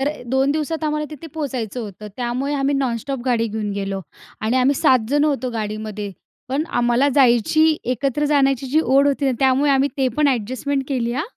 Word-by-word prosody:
तर 280 +2 +1 0.2
2 265 +1 +2
दिवसात 310 +2 -2
आम्हाला 300 0 -1
तिथे 305 +2 -9
पोहोचायचं 255 -6 -3
होतं. 210 0 -8
त्यामुळे 255 +4 -2
आम्ही 280 0 +1
नॉनस्टॉप 265 0 -2
गाडी 235 -3 +1
घेऊन 215 -1 -3
गेलो 195 -1 -3 0.4
आणि 225 +4 0
आम्ही 260 +2 +3
7 255 -1 +4
जण 290 +2 +2
होतो 265 -4 0
गाडीमध्ये. 215 -2 -4 0.4
पण 280 +4 0
आम्हाला 240 +2 +2
जायची, 285 +5 +4
एकत्र 270 +4 -1
जाण्याची 275 -3 +2
जी 305 +5 +2
ओढ 275 0 +3
होती 280 0 0
ना, 265 - +2
त्यामुळे 270 +2 +3
आम्ही 275 +1 +3
ते 265 -2 +2
पण 300 -1 +3
ॲडजस्टमेंट 260 +3 -1
केली 240 -3 -1
हा. 270 - -1
265 Hz, 185 wpm, -21 LUFS, 235-285 Hz, 0.4 s, 7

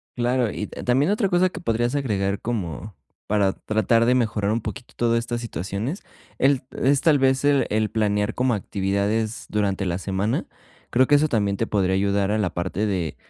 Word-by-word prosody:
Claro, 120 -1 +1
y 105 - -4
t - - -9
también 135 +8 +2
otra 205 -1 +1
cosa 180 0 +3
que 180 - -8
podrías 120 -2 0
agregar 100 -7 -1
como 105 -3 -4 0.3
para 100 -2 +2
tratar 110 +2 +1
de 125 +2 +3
mejorar 110 -4 0
un 115 +2 0
poquitito 120 +3 -8
todas 115 0 +2
estas 120 0 -4
situaciones, 110 - -4 0.4
el 135 0 +3
es 140 +1 +1
tal 155 -4 +4
vez 130 0 +2
el 145 -1 +3
el 110 0 +1
planear 105 -2 0
como 125 0 +1
actividades 100 +3 -1
durante 100 -2 0
la 85 -1 -1
semana. 95 +3 -1 0.4
Creo 130 +2 +4
que 145 - +5
eso 150 +2 +4
también 100 -7 0
te 115 - -1
podría 95 -3 +1
ayudar 100 +1 +1
a 110 - +1
la 100 -4 0
parte 95 +4 -2
de 90 -6 -2
110 Hz, 190 wpm, -23 LUFS, 100-125 Hz, 0.4 s, que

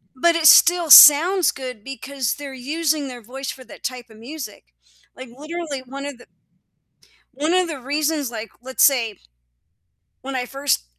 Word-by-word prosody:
but 335 +6 +1
it 325 -1 -2
still 345 0 +5
sounds 340 +6 +8
good 250 -5 -9
because 270 -2 -5
they're 280 -2 -9
using 300 +2 -3
their 245 -2 -10
voice 265 +5 -8
for 260 - -8
that - - -15
type 245 -2 -6
of 220 - -17
music. 230 - -11 0.4
Like, 255 -1 -11
literally 305 -2 -7
one 275 +2 -9
of 285 -4 -8
the - - -19 1.1
one 305 +6 -2
of 365 -2 +1
the 290 -5 -7
reasons, 290 0 -2
like, 225 -1 -8
let's 260 0 0
say 235 -7 +1 1.0
when 270 0 -7
I 250 -1 -3
first 275 - -2
275 Hz, 165 wpm, -20 LUFS, 250-310 Hz, 1.1 s, sounds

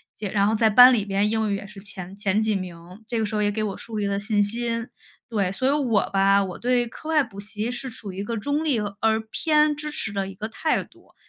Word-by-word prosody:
且 205 -2 -5
然 200 -1 +2
后 220 - +2
在 220 0 +4
班 250 +4 +9
里 210 -4 +1
边 200 +1 +1
英 220 -1 0
语 - - +1
也 200 0 -6
是 205 -1 -12
前 190 -2 -9
前 200 +1 +1
几 220 -1 +1
名， 180 +3 -8
这 230 -1 -2
个 220 - +1
时 215 +1 -4
候 210 - +1
也 205 - +2
给 215 - -2
我 200 -3 -3
树 225 -2 -7
立 205 -1 0
了 200 0 -1
信 205 0 +1
心。 230 +2 0 0.4
对， 200 -5 0
所 260 +6 -1
以 - - +4
我 250 -9 +1
吧， 195 0 +4
我 190 -2 -4
对 245 -1 +1
课 310 +7 -10
外 310 -2 +4
补 225 -6 -7
习 210 +3 -4
是 255 +2 -4
处 210 -4 -8
于 190 - -7
一 - - -3
个 230 +2 -3
中 285 +8 -1
立 285 -7 +1
而 215 +2 0
偏 300 +2 +2
支 300 +1 -5
持 220 -8 -2
的 195 -1 -1
一 195 - -8
个 210 +3 -5
态 310 +8 0
度， - - -24
215 Hz, 285 characters per minute, -24 LUFS, 200-240 Hz, 0.4 s, 班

